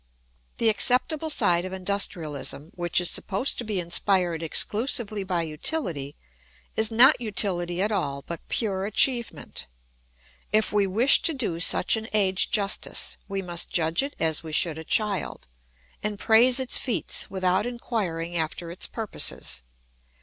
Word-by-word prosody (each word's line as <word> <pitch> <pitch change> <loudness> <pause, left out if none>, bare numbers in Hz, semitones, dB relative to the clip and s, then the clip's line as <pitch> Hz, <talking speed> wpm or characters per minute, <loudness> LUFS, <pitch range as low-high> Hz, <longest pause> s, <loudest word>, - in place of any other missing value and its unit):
] - - -40
The 230 - +1
acceptable 260 +8 +2
side 175 - +3
of 185 0 -6
industrialism, 165 -6 -2
which 175 -1 0
is 175 - +2
supposed 205 +8 0
to - - -3
be 215 -4 -2
inspired 175 -1 0
exclusively 210 - -1
by 180 -3 -2
utility, 155 - -2 0.6
is 220 -1 +3
not 245 +4 +6
utility 185 -5 -1
at 210 - -1
all 140 -9 -3
but 170 - -6
pure 195 -4 -1
achievement. 235 +2 -1 0.8
If 215 -1 +2
we 205 -1 +2
wish 230 +9 +4
to 325 - 0
do 210 -11 -2
such 175 - +5
an 220 0 -6
age 190 -3 +2
justice 205 -2 0
we 195 -1 -4
must 175 -1 -1
judge 165 +2 +1
it 280 +1 -5
as 160 -2 +1
we 160 -2 -9
should 160 0 +2
a - - -8
child 205 0 -1 0.5
and 210 0 -3
praise 240 +5 +5
its 260 -2 0
feats 245 - 0
without 185 +2 0
inquiring 190 -9 -4
after 165 +1 -3
its 175 - -3
purposes. 220 - -2
195 Hz, 150 wpm, -25 LUFS, 170-220 Hz, 0.8 s, not